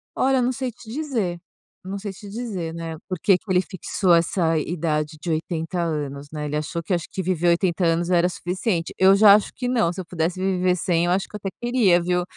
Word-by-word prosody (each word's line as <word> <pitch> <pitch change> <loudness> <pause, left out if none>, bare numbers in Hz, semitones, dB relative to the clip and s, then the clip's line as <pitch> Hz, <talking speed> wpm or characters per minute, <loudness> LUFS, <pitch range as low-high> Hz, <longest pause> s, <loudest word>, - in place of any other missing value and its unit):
Olha, 265 0 +2
eu - - +2
não 250 - +1
sei 260 -1 -3
te 220 0 -13
dizer, 230 - -2 0.4
eu 185 - -7
não 200 - -3
sei 200 0 -5
te 200 +1 -11
dizer, 200 -8 -4
né, 165 -1 -5
porque 185 +1 +2
que - - -27
ele 180 - +4
fixou 185 -1 0
essa 165 -1 +1
idade 155 -1 -2
de 175 - -4
80 165 +2 -2
anos, 145 -3 -3
né. 150 -1 -4
Ele 150 - -3
achou 160 +3 -3
que, 175 - -2
acho 170 -2 -1
que 190 - -3
viver 175 -1 +1
80 175 +1 +1
anos 170 +1 +1
era 175 -1 +4
suficiente. 180 0 -2
Eu 190 +1 +6
já 205 0 +8
acho 210 - 0
que 250 - -3
não, 225 -9 +1
se 185 - -5
eu - - -10
pudesse 170 +1 -2
viver 185 -1 +1
100, 170 -1 +1
eu 175 - +1
acho 190 +2 0
que - - -12
eu - - -2
até 195 - -1
queria, 235 -8 +3
viu. 180 0 0
180 Hz, 240 wpm, -23 LUFS, 165-195 Hz, 0.4 s, já